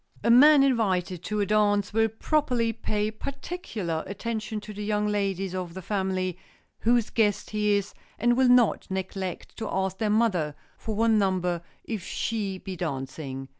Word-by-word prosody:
A 235 - +4
man 285 +3 +8
invited 190 -9 +1
to 210 -1 -1
a - - +2
dance 205 -1 +2
will 225 0 +3
properly 240 -1 0
pay 210 -1 -2
particular 220 - -4
attention 215 +1 -4
to 210 - -9
the 210 +1 -6
young 210 0 0
ladies 195 -3 -1
of 180 -2 -4
the 190 - -5
family 185 -2 -1 0.4
whose 235 -1 +2
guest 210 -3 +1
he 210 -1 +2
is, 200 0 -2 0.2
and 240 0 +3
will 260 0 +4
not 245 -3 +4
neglect 190 -1 -4
to 225 - -4
ask 190 0 -1
their 215 - +1
mother 195 -9 +1 0.2
for 220 - -5
one 225 0 +3
number 180 -3 0 0.2
if 215 -6 -4
she 205 -2 -2
be 185 0 -7
dancing. 135 -4 -5
210 Hz, 165 wpm, -27 LUFS, 185-225 Hz, 0.4 s, man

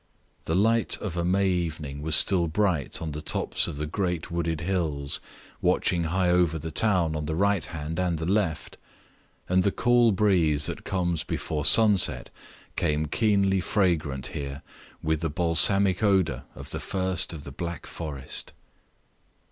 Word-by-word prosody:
The 80 - -1
light 115 +4 +2
of 95 -5 -6
a 85 - -1
May 95 +3 +1
evening 80 -6 -3
was 75 0 0
still 90 -3 +3
bright 85 -4 -1
on 80 - -4
the 75 +1 -6
tops - - +1
of - - -6
the 75 - -3
great 90 +1 -3
wooded 85 -2 -2
hills 80 -6 -1 0.4
watching 85 -1 +1
high 90 +2 +1
over 90 -2 +2
the 80 +1 -6
town 85 -2 +2
on 75 -1 -4
the 80 - -2
right 100 -1 +1
hand 80 0 -5
and 90 -2 0
the 80 - -4
left; 95 -4 -1 0.7
and 90 +1 +2
the 100 - +1
cool 120 0 +3
breeze 90 -7 +2
that - - -2
comes 85 -5 -1
before 75 -2 -4
sunset 105 -5 +5 0.4
came 75 +1 0
keenly 100 +2 +1
fragrant 80 - 0
here 70 -1 -6 0.4
with 80 0 0
the 80 - -1
balsamic 90 +4 +3
odor 95 -5 +1
of - - -10
the - - -4
first 95 -2 -1
of 80 -4 -8
the 70 - -9
Black 85 +4 -6
Forest. 70 -5 -6
85 Hz, 160 wpm, -26 LUFS, 80-95 Hz, 0.7 s, sunset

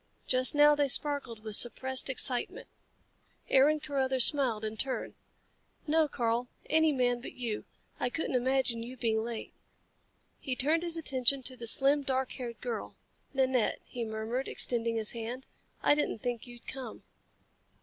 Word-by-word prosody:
Just 255 +2 +1
now 295 0 +7
they 290 -1 +2
sparkled 275 -5 +2
with 215 -2 -2
suppressed 260 +3 +1
excitement. 255 -1 -2 0.8
Aaron 290 +3 +5
Carruthers 265 -4 +3
smiled 250 -7 +3
in 215 0 -4
turn. 260 +4 -3 0.7
"No, 315 0 +3
Karl. 235 -2 -1 0.2
Any 320 0 +3
man 245 -3 +1
but - - -8
you. 235 -4 -4 0.3
I 250 - 0
couldn't 320 +2 -3
imagine 255 -2 +1
you 250 +3 -8
being 220 -2 0
late." 230 -1 -6 0.9
He 260 -3 -3
turned 310 +6 +2
his 340 -1 -4
attention 270 -3 +3
to 255 +1 -4
the 235 -2 -7
slim, 275 +5 +4
dark 265 -1 -1
haired 240 -3 -6
girl. 240 -3 -5 0.4
"Nanette," 260 -3 +1
he 240 - -5
murmured, 220 +4 -3
extending 230 -1 -1
his 220 -1 -1
hand, 235 +3 -6 0.4
"I - - +5
didn't 295 -5 -1
think 240 +1 -4
you'd 240 -1 -13
come." 260 -4 -7
255 Hz, 150 wpm, -30 LUFS, 235-275 Hz, 0.9 s, now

